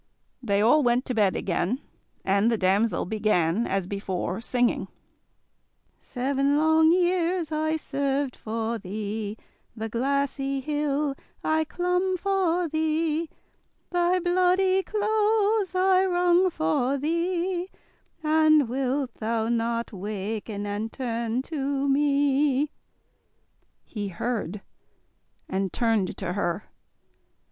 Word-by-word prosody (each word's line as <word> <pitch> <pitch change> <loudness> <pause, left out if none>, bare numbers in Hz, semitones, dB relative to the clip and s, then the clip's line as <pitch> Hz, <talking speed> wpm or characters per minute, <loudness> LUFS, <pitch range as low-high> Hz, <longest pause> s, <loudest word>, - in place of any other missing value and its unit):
They 205 -4 +1
all 275 +7 +5
went 245 0 +2
to 255 - -2
bed 205 -5 +2
again, 190 +7 -1 0.5
and 200 +4 +3
the 230 - +1
damsel 200 +4 +1
began, 210 -1 +1
as 195 -1 -1
before, 190 0 -3
singing: 245 0 0 1.1
"Seven 275 +2 0
long 315 +1 +4
years 350 -2 +1
I 315 +1 0
served 280 -3 -1
for 225 +1 -3
thee, 210 +2 -4 0.4
The 225 0 -4
glassy 275 +3 -1
hill 290 0 -1 0.3
I 315 0 +1
clomb 360 +3 0
for 360 -2 +1
thee, 315 +1 0 0.6
Thy 355 +1 +2
bloody 365 +2 +3
clothes 425 -1 +1
I 370 0 +4
wrang 360 0 +3
for 250 - 0
thee; 345 +4 -1 0.5
And 310 -2 +4
wilt 260 +1 -1
thou 225 0 -1
not 235 0 -1
waken 205 +1 -4
and 205 +2 -3
turn 235 -1 -2
to 280 -2 -2
me?" 285 0 +2 1.1
He 205 -3 -5
heard, 205 0 -3 0.9
and 190 -1 -2
turned 225 -5 0
to 180 -2 -3
her. 195 0 -2
275 Hz, 105 wpm, -26 LUFS, 220-330 Hz, 1.1 s, all